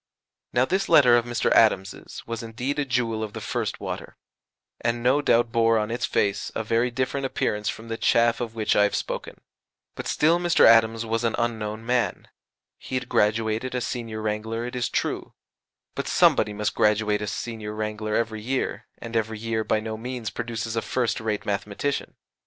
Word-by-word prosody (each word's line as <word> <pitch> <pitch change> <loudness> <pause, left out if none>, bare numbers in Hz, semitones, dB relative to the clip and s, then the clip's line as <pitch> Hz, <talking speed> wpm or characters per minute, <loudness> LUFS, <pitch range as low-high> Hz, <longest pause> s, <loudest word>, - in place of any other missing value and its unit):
Now 125 +1 +3
this 190 +6 -1
letter 125 -5 +7
of 120 -1 +2
Mr. 120 0 0
Adams's 95 -4 +2
was 115 0 -4
indeed 125 +5 -3
a 145 - +1
jewel 120 -4 0
of 105 -1 -6
the - - -5
first - - -3
water, - - -6 0.6
and 120 0 -1
no 130 +4 +4
doubt 120 -4 +3
bore 115 0 +3
on 105 +1 -1
its 120 +1 -1
face 100 0 0
a 110 - -1
very 115 +3 +1
different 130 +2 -1
appearance 105 -4 -1
from 110 - -6
the 115 0 -3
chaff 120 +1 +3
of 115 -2 -4
which 110 -2 +1
I - - +5
have 105 0 +2
spoken; - - -4 0.6
but - - -6
still 165 +3 +3
Mr. 175 -1 +4
Adams 115 0 +5
was 115 +1 -1
an 115 -1 +1
unknown 110 -2 -2
man: 125 0 0 0.5
he 130 - -6
had 130 -1 -3
graduated 110 +4 +1
as 125 - -1
Senior 115 -3 -4
Wrangler 110 +2 -2
it 125 - -6
is 120 -2 -1
true, - - -2 0.6
but - - -4
somebody 105 - +4
must 105 0 -2
graduate 105 0 +2
as 105 -1 -3
Senior 110 -2 -5
Wrangler 110 0 -3
every 110 -2 -1
year, 130 +4 -2
and 115 0 -8
every 110 -1 0
year 110 0 -2
by 110 - +1
no 110 0 -5
means 120 -1 -5
produces 115 -1 -4
a 115 - 0
first 120 +2 -1
rate 110 -2 -2
mathematician. 105 +7 -2
115 Hz, 185 wpm, -25 LUFS, 110-120 Hz, 0.6 s, letter